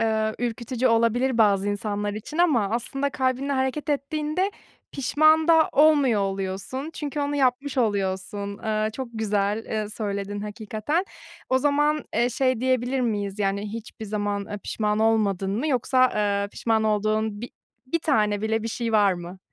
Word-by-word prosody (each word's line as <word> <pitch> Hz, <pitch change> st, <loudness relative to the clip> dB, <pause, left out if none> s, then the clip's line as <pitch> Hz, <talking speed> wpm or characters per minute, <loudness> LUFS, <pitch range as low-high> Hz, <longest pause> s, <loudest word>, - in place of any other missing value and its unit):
eee, 220 Hz, -1 st, +1 dB
ürkütücü 240 Hz, +1 st, -2 dB
olabilir 230 Hz, +2 st, +2 dB
bazı 205 Hz, -2 st, +3 dB
insanlar 205 Hz, 0 st, -2 dB
için 260 Hz, +9 st, -7 dB
ama 250 Hz, -, +3 dB
aslında 270 Hz, +4 st, -2 dB
kalbinle 265 Hz, 0 st, -1 dB
hareket 265 Hz, +3 st, -1 dB
ettiğinde 305 Hz, +6 st, -1 dB, 0.4 s
pişman 310 Hz, +4 st, +3 dB
da 320 Hz, -1 st, +6 dB
olmuyor 285 Hz, -7 st, +4 dB
oluyorsun. 195 Hz, +9 st, -3 dB
Çünkü 295 Hz, -1 st, -4 dB
onu 285 Hz, 0 st, -1 dB
yapmış 265 Hz, 0 st, +1 dB
oluyorsun. 200 Hz, -2 st, -1 dB
Iıı, 215 Hz, 0 st, -1 dB
çok 260 Hz, +2 st, -6 dB
güzel, 210 Hz, 0 st, -1 dB
eee, 215 Hz, -1 st, -3 dB
söyledin 205 Hz, -1 st, -4 dB
hakikaten. 215 Hz, -, -2 dB, 0.4 s
O 260 Hz, -, +3 dB
zaman, 295 Hz, +2 st, +1 dB
eee, 235 Hz, +2 st, +3 dB
şey 255 Hz, -1 st, +1 dB
diyebilir 255 Hz, 0 st, +1 dB
miyiz, 205 Hz, -4 st, -2 dB
yani, 200 Hz, +1 st, -1 dB
hiçbir 225 Hz, -1 st, -7 dB
zaman, 205 Hz, -1 st, -2 dB
eee, 205 Hz, -, -5 dB
pişman 210 Hz, -1 st, -1 dB
olmadın 205 Hz, -3 st, +1 dB
mı 305 Hz, +5 st, -1 dB
yoksa, 255 Hz, -1 st, +3 dB
eee, 200 Hz, -1 st, 0 dB
pişman 220 Hz, -1 st, 0 dB
olduğun 215 Hz, 0 st, 0 dB
bi 240 Hz, -, -6 dB, 0.4 s
bir 335 Hz, +6 st, 0 dB
tane 210 Hz, -9 st, +1 dB
bile 220 Hz, 0 st, 0 dB
bir 225 Hz, -, -3 dB
şey 230 Hz, 0 st, -3 dB
var 205 Hz, -3 st, +4 dB
mı? 175 Hz, +1 st, -8 dB
225 Hz, 155 wpm, -25 LUFS, 205-265 Hz, 0.4 s, da